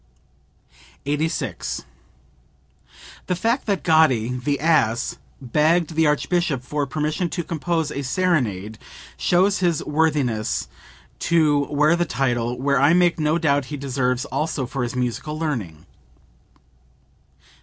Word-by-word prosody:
86. 150 +3 -2 1.4
"The 180 - 0
fact 230 +8 0
that 200 -3 0
Gatti, 155 -9 +4
the 140 +3 -1
ass, 150 -8 +1 0.2
begged 155 +6 +1
the 160 0 +3
Archbishop 150 -2 0
for 145 +2 -2
permission 155 +5 -2
to 175 - -3
compose 165 -1 -2
a 140 - -3
serenade 125 - -1 0.4
shows 190 +3 +2
his 175 -4 +1
worthiness 145 -8 0 0.5
to 150 -4 +2
wear 150 +3 +3
the 175 0 0
title, 120 -5 -1
which 140 +1 +1
I 140 +4 +5
make 175 -1 +3
no 155 +1 +2
doubt 145 -5 +1
he 145 +2 -6
deserves 125 -2 -1
also 150 -3 -2
for 135 +2 -4
his 120 0 -3
musical 125 +5 -3
learning." 115 - -4
150 Hz, 120 wpm, -22 LUFS, 125-165 Hz, 1.4 s, I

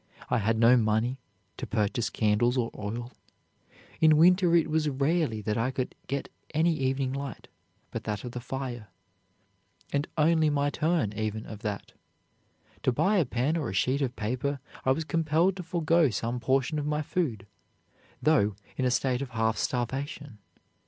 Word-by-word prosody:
I 120 - +3
had 110 +2 +1
no 115 +2 +6
money 115 +3 +1 0.4
to - - -5
purchase 115 +2 0
candles 110 +4 +2
or 115 -2 0
oil; 115 +4 -5 0.9
in 155 -1 +6
winter 180 +1 +5
it 165 -2 +4
was 155 -1 +1
rarely 140 -4 0
that 105 +1 -1
I 115 +3 +1
could 130 -1 -3
get 140 0 -2 0.3
any 165 +2 +3
evening 135 -1 0
light 140 0 -6 0.4
but - - -5
that 105 -2 -3
of 125 - -5
the 125 - -5
fire, 125 -3 -5 1.1
and 140 +1 0
only 160 0 +4
my 145 -1 +1
turn, 155 - 0
even, 110 0 -3
of 110 - -8
that. 105 -2 -4 0.9
To - - +2
buy 200 - +2
a 170 - +3
pen 130 +6 0
or 150 -8 -1
a - - -5
sheet 130 +9 +1
of 130 -2 -1
paper 130 +6 -2 0.3
I 130 - +4
was 160 +5 +1
compelled 165 +4 +2
to - - -4
forego 165 -3 +2
some 115 +3 -2
portion 135 +5 +1
of 145 - -3
my 150 0 0
food, 135 - -2 0.8
though 125 -9 +3 0.2
in 130 - 0
a - - +3
state 125 0 +1
of 140 - -4
half 115 -2 0
starvation. 135 0 -3
130 Hz, 170 wpm, -28 LUFS, 115-155 Hz, 1.1 s, no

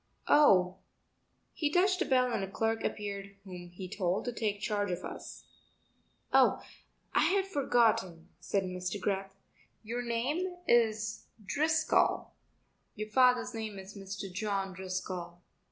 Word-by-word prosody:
"Oh...." 185 -11 +5 0.8
He 295 - 0
touched 370 +2 +3
a - - +2
bell 255 -2 +2
and 195 - -1
a 195 - -4
clerk 225 +3 -1
appeared 200 -1 -4
whom 180 -2 -9
he 185 +2 -8
told 185 0 -1
to 245 - -2
take 210 -3 -1
charge 205 -1 -1
of 180 0 -3
us. - - -8 0.9
"Oh, - - +5 0.5
I - - +4
had 385 0 +2
forgotten," 225 - +1
said 200 -1 0
Mr. 180 +1 -4
Greth, 195 0 -2 0.5
"your 235 +3 -3
name 275 +11 -1
is 220 -2 +2 0.2
Driscoll; 310 +9 +2 0.6
your 215 +1 -5
father's 250 +1 +4
name 220 -3 -5
is 190 +1 -9
Mr. 195 -1 -6
John 195 -1 -2
Driscoll." 185 -2 -5
205 Hz, 135 wpm, -31 LUFS, 190-240 Hz, 0.9 s, Oh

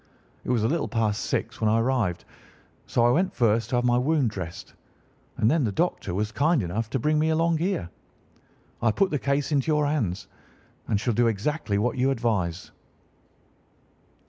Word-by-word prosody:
It - - -7
was 120 -4 +1
a - - +3
little 160 +3 0
past 110 -3 -1
six - - -3
when 110 - +3
I 110 +1 +3
arrived, 115 -7 0 0.6
so 120 - +2
I 120 - +5
went 180 +8 +1
first 115 -1 +2
to 130 - 0
have 120 0 +1
my 120 0 +3
wound 140 -3 +1
dressed, 90 -5 -7 0.6
and 110 +3 +3
then 160 -2 +2
the 110 - 0
doctor 100 - -1
was 105 +2 -1
kind 145 - +2
enough 105 +6 -3
to 135 - -1
bring 150 +5 +1
me 155 +1 +2
along 165 0 +2
here. 170 - -1 0.9
I 115 -2 +3
put 195 - +1
the 145 - 0
case 140 +2 -1
into 140 -1 +1
your 150 -1 +2
hands 110 - -1 0.6
and 100 - +1
shall 120 +2 0
do 120 +2 +3
exactly 110 0 -1
what 120 +5 0
you 130 +2 +3
advise." 105 -9 -1
120 Hz, 185 wpm, -25 LUFS, 105-150 Hz, 0.9 s, I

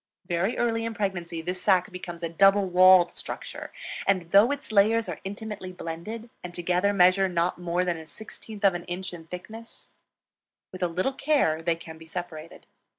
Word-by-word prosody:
Very 175 +5 -1
early 230 -1 0
in 230 0 -4
pregnancy 175 -6 -3
this 180 +2 -4
sac 185 -3 +3
becomes 175 -2 -8
a - - 0
double 195 +4 +4
walled 185 -1 +6
structure; - - -7 0.4
and, 185 -4 +1
though 205 +4 +7
its 285 -4 -4
layers 220 +2 +4
are - - -5
intimately 205 -1 -6
blended, 195 +7 -7
and 175 -1 -7
together 180 +3 +1
measure 190 0 +4
not 175 0 0
more 175 +1 0
than 175 -2 -1
1/16 210 +5 -10
of 195 -2 +5
an 175 0 -5
inch 180 +1 -5
in 165 -2 -10
thickness, 220 +7 -10 0.8
with 185 - -9
a 180 - +2
little 185 +10 -1
care 265 - +1
they 165 0 +1
can 160 -1 -11
be 160 - -13
separated. 165 -1 -7
185 Hz, 175 wpm, -26 LUFS, 175-205 Hz, 0.8 s, though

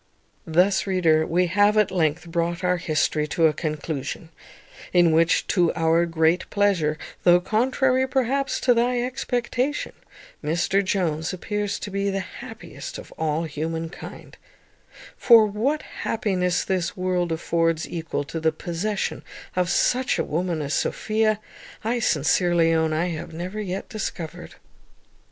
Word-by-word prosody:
Thus, 180 +5 +2
reader, 165 -5 +3
we 180 +2 +2
have 205 +4 +3
at 210 -2 +3
length 165 -2 0
brought 170 +1 -2
our 180 0 +2
history 155 -2 0
to 165 +3 +2
a 155 - +4
conclusion, 155 0 -4 0.6
in 175 -2 +5
which, 165 +1 +3
to 175 -4 +3
our 165 +1 +2
great 165 +1 +1
pleasure, 185 -7 +1 0.2
though 175 0 +6
contrary, 255 +6 +1
perhaps, 270 +1 0
to 250 - +4
thy 240 +1 +1
expectation, 255 +2 -2 0.5
Mr 175 +6 +1
Jones 175 -4 -1
appears 205 +2 -2
to 205 - -7
be 200 +1 -1
the 195 0 -1
happiest 190 - -8
of - - -11
all 160 0 -1
humankind; 160 +2 -6 0.8
for 230 -3 +7
what 230 +9 -1
happiness 185 -5 -1
this 185 -2 -2
world 180 -2 0
affords 165 0 0
equal 160 -3 -3
to 165 +3 -5
the 160 0 +2
possession 180 +5 -3 0.3
of 180 -1 +1
such 255 +8 +2
a - - +1
woman 165 -1 -2
as 145 - -3
Sophia, 215 -1 0 0.4
I 235 +3 0
sincerely 170 -1 +2
own 160 -1 +2
I 165 +3 0
have 165 0 -6
never 180 +6 -5
yet 190 -1 -4
discovered. 185 -8 -6
180 Hz, 135 wpm, -24 LUFS, 165-210 Hz, 0.8 s, for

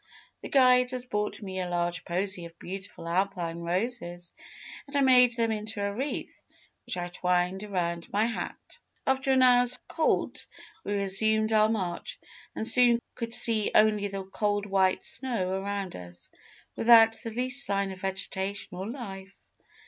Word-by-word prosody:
"The - - -8
guides 250 -1 +4
had 250 0 -5
brought 210 +1 -3
me 190 -1 -5
a 180 -1 -3
large 175 0 -2
posy 180 0 -1
of 170 0 -13
beautiful 190 -2 -9
Alpine 175 -2 -2
roses, 175 -1 -4 0.5
and 280 - -9
I 280 - +3
made 250 -2 +5
them 230 -1 0
into 215 0 -5
a 200 0 -2
wreath, 270 +7 -5 0.4
which - - -3
I 175 0 -4
twined 180 +2 -1
around 170 -4 -3
my 210 +2 +1
hat. 235 - -6 0.3
"After 265 +1 0
an 260 -1 +4
hour's 245 0 +5
halt, 320 -1 -1 0.4
we 205 - -3
resumed 215 +3 +2
our 215 0 +4
march, 190 -6 -4 0.4
and 220 - -1
soon 240 -2 +7
could 230 -1 -6
see 225 -2 +5
only 210 -1 +3
the 195 -1 -5
cold 205 +1 -2
white 190 -2 +1
snow 230 -8 -2
around 200 -1 -4
us, 90 -1 -11 0.4
without 225 -1 +6
the 230 - -4
least 250 +4 +1
sign 200 -1 0
of 185 -1 -10
vegetation 190 0 -3
or 195 +3 -5
life. 195 -6 -8
205 Hz, 155 wpm, -27 LUFS, 185-235 Hz, 0.5 s, soon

